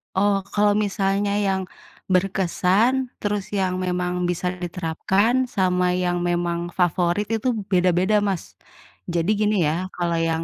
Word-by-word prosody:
Oh, 200 +1 +3 0.2
kalau 205 0 +4
misalnya 200 0 0 0.2
yang 190 0 0 0.5
berkesan, 195 +7 +1
terus 205 -1 -3
yang 190 -3 0
memang 180 0 -1
bisa 175 +1 -1 0.2
diterapkan 190 +8 +1
sama 180 -2 +2
yang 180 -1 0
memang 175 0 -1
favorit 175 +3 +1
itu 220 +3 -2 0.2
beda-beda, 185 +3 +3
Mas. 195 -4 -3 0.6
Jadi 170 +1 0
gini 210 0 +2
ya, 180 +5 -2
kalau 170 -1 -1
yang 165 0 0
185 Hz, 125 wpm, -23 LUFS, 175-205 Hz, 0.6 s, kalau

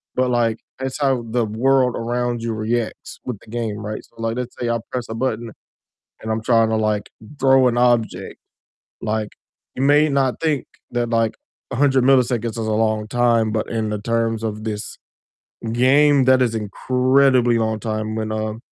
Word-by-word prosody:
but, 130 0 +1
like, 115 -2 +1 0.2
that's 130 +2 -4
how 135 -4 +1
the 120 -2 +1
world 125 +3 +2
around 120 0 -2
you 115 - -2
reacts 110 +1 -3
with 125 -5 -4
the - - -19
game, 115 -3 -3
right? 105 0 -4
So, - - -30
like, 115 +1 -2
let's 125 -1 -5
say 120 - -1
I 115 0 0
press 125 -2 -3
a - - -4
button 115 -2 -2 0.7
and 110 - -5
I'm 110 0 -2
trying 115 -1 +3
to, 110 - +1
like, 105 -1 0 0.3
throw 130 -1 +5
an 120 0 0
object, 120 -2 +1 0.7
like, 110 0 -1 0.5
you 130 - -2
may 145 +2 +5
not 135 -3 0
think 155 -5 0 0.2
that, 120 -1 -1
like, 115 -1 +1 0.4
100 135 -1 +3
milliseconds 125 -3 +3
is 115 - -8
a 115 - -2
long 110 0 0
time, 115 -2 +2
but 110 -1 -2
in 110 -2 -2
the 105 - -3
terms 115 0 -1
of 110 -1 -3
this 105 -1 -5 0.7
game, 140 +3 +4
that 130 0 +5
is 120 -3 +1
incredibly 125 +3 +2
long 110 -1 0
time 110 -1 -3
when, 110 -1 -3
um, 110 0 -3
115 Hz, 180 wpm, -21 LUFS, 110-130 Hz, 0.7 s, throw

